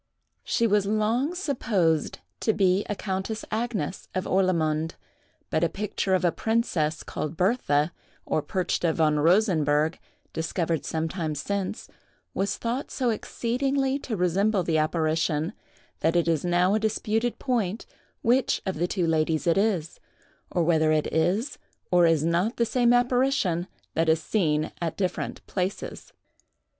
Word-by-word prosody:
She 235 - +1
was 205 -2 +2
long 225 - +1
supposed 205 - 0 0.2
to 220 - +1
be 190 -1 +3
a 205 - -1
Countess 190 +3 -3
Agnes, 215 -7 -2
of 185 - -1
Orlamunde; 165 -4 +1 0.6
but 155 - +1
a 170 - +3
picture 200 -2 -1
of 180 -1 +1
a 175 - +4
princess 175 -10 0
called 155 +1 -5
Bertha, 175 -6 +2 0.3
or 155 - 0
Perchta 175 -1 0
von 155 -2 +2
Rosenberg, 160 -3 +3 0.3
discovered 160 -1 -1
some 160 0 -1
time 160 -3 -3
since, 200 +7 -3 0.5
was 195 0 -1
thought 240 +4 -3
so 250 -3 0
exceedingly 270 +5 -1
to 235 -6 -4
resemble 190 +3 +2
the 160 -2 +1
apparition, 160 +2 0 0.5
that 165 +2 +1
it 170 -1 +2
is 160 -3 +1
now 180 +2 +3
a 215 - +2
disputed 220 +2 0
point 225 -6 -1 0.4
which 250 +2 +3
of 190 -4 -2
the 175 - +1
two 180 -1 0
ladies 160 -1 +1
it 170 -1 +3
is, 195 -6 0 0.5
or 175 - +1
whether 160 -1 +3
it 155 -1 0
is 190 - 0 0.3
or 175 -1 +5
is 160 -2 +3
not 175 +8 +1
the 235 - +3
same 240 +1 +2
apparition 245 -8 +2 0.3
that 165 0 +1
is 160 0 +4
seen 155 -4 0
at 165 -2 -2
different 185 -2 -3
places. 185 +1 -4
185 Hz, 145 wpm, -26 LUFS, 160-220 Hz, 0.6 s, or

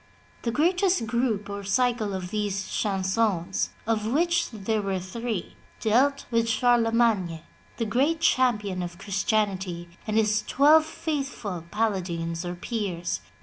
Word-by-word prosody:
The 235 - -1
greatest 355 - +2
group 225 -3 0
or 200 0 -5
cycle 225 -1 +1
of 180 -1 -5
these 205 -2 -2
chansons, 190 -2 0 0.2
of 220 -1 0
which 340 +7 +2
there 215 -1 -2
were 195 -2 -1
three, 215 +2 -4 0.3
dealt 265 +6 +2
with 230 0 +2
Charlemagne, 225 -7 +2 0.4
the 230 - -1
great 275 +10 +1
champion 210 - +2
of 175 0 -5
Christianity, 195 -4 -1 0.2
and 215 0 0
his 215 -1 +3
twelve 305 +3 +5
faithful 275 - -4
paladins 175 -5 -1
or 175 0 -4
peers. 175 - -3
215 Hz, 125 wpm, -26 LUFS, 190-245 Hz, 0.4 s, twelve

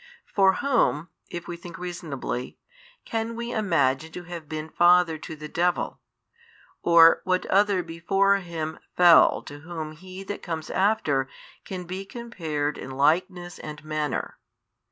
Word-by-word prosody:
For 195 -1 +3
whom 190 - +1 0.2
(if 175 0 -6
we 175 - -5
think 170 0 -10
reasonably) 165 -8 -5 0.5
can 225 0 -3
we 235 +1 -4
imagine 160 - +1
to 180 - -7
have 170 -3 -8
been 155 0 -4
father 175 -1 +4
to 160 0 -7
the 150 0 -8
devil, 175 +3 0 0.8
or 165 -1 +7
what 185 0 0
other 200 -1 +3
before 195 +4 +2
him 165 -4 -5 0.2
fell 175 -2 +6
to 145 - -10
whom 160 0 -6
he 185 +4 -10
that 200 +1 -6
comes 165 -3 -5
after 155 -10 +1 0.4
can 185 -2 -5
be 185 +2 -5
compared 165 - -4
in - - -7
likeness 175 +6 0
and 150 0 -8
manner 155 -3 -3
175 Hz, 140 wpm, -25 LUFS, 155-185 Hz, 0.8 s, or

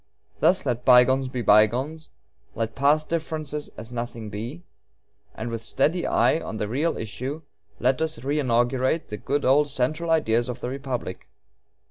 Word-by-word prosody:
Thus 185 -2 +3
let 125 -2 -1
bygones 130 +1 +5
be 125 -2 -4
bygones; 125 +10 +3 0.5
let 115 0 -2
past 150 +3 +2
differences 155 -3 -3
as 115 +3 -9
nothing 115 -2 -5
be; 105 -4 -6 0.7
and 120 - -5
with 115 -1 -4
steady 150 +9 0
eye - - +3
on 110 - -6
the 105 - -2
real 145 +9 0
issue, 130 +8 -5 0.3
let 130 +4 +1
us 160 0 -1
reinaugurate 130 +1 0
the 105 - -5
good 145 +5 -1
old 145 +3 +4
'central 155 +5 -1
ideas' 120 -7 +2
of 125 0 -5
the 120 - -4
republic. 130 -8 -5
130 Hz, 150 wpm, -25 LUFS, 115-150 Hz, 0.7 s, bygones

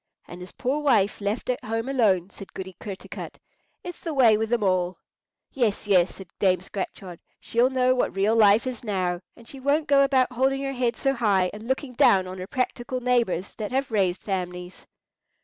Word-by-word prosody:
"And 175 +1 -10
his 180 - -9
poor 270 +4 -1
wife 215 -9 +2
left 205 +3 -2
at 250 - -5
home 225 +2 -3
alone," 200 -9 +2
said 195 - -12
Goody 190 -1 -7
Kertarkut. 195 -3 -8 0.5
"It's 355 -1 -8
the 325 -3 -4
way 235 -5 +6
with 220 +1 -2
'em 240 -3 +1
all!" 185 -2 +1 0.5
"Yes, 235 -8 0
yes," 185 -3 +3
said 195 - -10
Dame 185 -2 +3
Scratchard, 185 -2 -6 0.2
"she'll 240 +2 +1
know 255 -1 +2
what 250 - -1
real 200 +3 +2
life 215 0 +5
is 255 -3 -5
now, 185 -5 -1
and 230 - -16
she 270 - -10
won't 285 +3 +1
go 280 -1 +5
about 260 -2 +2
holding 270 +2 +1
her 275 0 -2
head 245 -2 0
so 270 +3 0
high, 200 -7 +1
and 215 +2 -9
looking 265 0 -2
down 190 -5 +4
on 185 0 -8
her 185 - -6
practical 255 +1 -2
neighbours 235 -7 0
that 215 0 -4
have 265 -1 -1
raised 190 -4 0
families." 180 -2 -5
220 Hz, 195 wpm, -25 LUFS, 190-255 Hz, 0.5 s, way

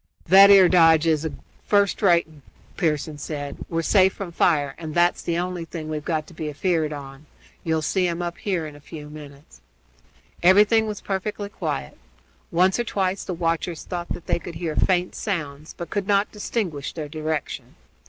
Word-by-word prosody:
"That 195 +3 +8
'ere 195 -2 +8
dodge 165 -3 +5
is 160 -1 +1
a 160 - -3 0.3
first 200 -1 +2
rate 175 -4 +4
un," 155 -2 -18 0.3
Pearson 155 -3 -1
said. 145 -1 -5
"We're 165 -1 -1
safe 190 +1 +4
from 195 -4 -7
fire, 145 -5 +2
and 155 -2 -6
that's 175 0 +3
the 170 -1 -2
only 180 0 -3
thing 160 -2 -7
we've 155 -1 -4
got 155 -1 -2
to 170 - -15
be 155 -1 -5
afeared 155 +1 0
on. 140 0 -9 0.4
You'll 160 -1 0
see 185 +4 +1
'em 170 0 -3
up 175 -1 -4
here 185 -6 -2
in 150 -1 -9
a - - -13
few 150 0 -10
minutes." 140 - -13 0.8
Everything 210 +5 +5
was 210 -1 -5
perfectly 200 +1 -3
quiet. 150 - -4 0.5
Once 185 +5 +2
or - - +2
twice 195 -3 -1
the 180 - -4
watchers 165 0 -2
thought 175 -1 -5
that - - -9
they - - 0
could 170 0 -9
hear 165 -2 -3
faint 180 -1 +1
sounds, 155 -7 -4
but 170 - -7
could 200 -2 -2
not 200 0 +2
distinguish 195 - -3
their 155 -3 -5
direction. 155 0 -4
170 Hz, 185 wpm, -23 LUFS, 155-185 Hz, 0.8 s, That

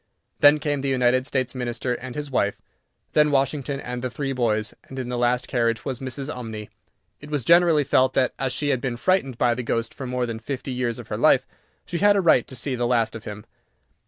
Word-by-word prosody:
Then 145 +1 +7
came 145 -2 -1
the 140 - -2
United 130 0 +2
States 130 -2 -1
Minister 125 -1 -2
and 125 0 -7
his 145 -1 -5
wife, 100 -5 0 0.5
then 150 0 +4
Washington 140 0 0
and 125 -2 -5
the 130 - -2
three 135 +3 -3
boys, 110 -4 0
and 135 - -10
in 125 -2 -4
the 125 - -2
last 120 +1 +1
carriage 115 -2 0
was 130 -3 -3
Mrs. 135 +1 -5
Umney. 110 -4 -7 0.5
It 145 - -11
was 145 -6 -2
generally 170 -3 +5
felt 130 -1 +2
that, 130 - +2
as 135 0 -1
she 145 +2 -1
had 130 -3 +1
been 125 -3 -2
frightened 135 -6 +1
by 120 -1 +3
the 125 - -3
ghost 115 -1 -2
for 130 - -7
more 125 0 -1
than 115 -2 -5
fifty 130 +3 -5
years 125 -2 -2
of - - -10
her - - -2
life, - - +4 0.4
she 170 - -3
had 205 +1 +5
a - - +3
right 160 -9 +4
to 130 - -8
see 130 +2 -2
the 120 -1 0
last 115 -2 +1
of 115 - -9
him. 105 0 -7
130 Hz, 230 wpm, -24 LUFS, 120-140 Hz, 0.5 s, Then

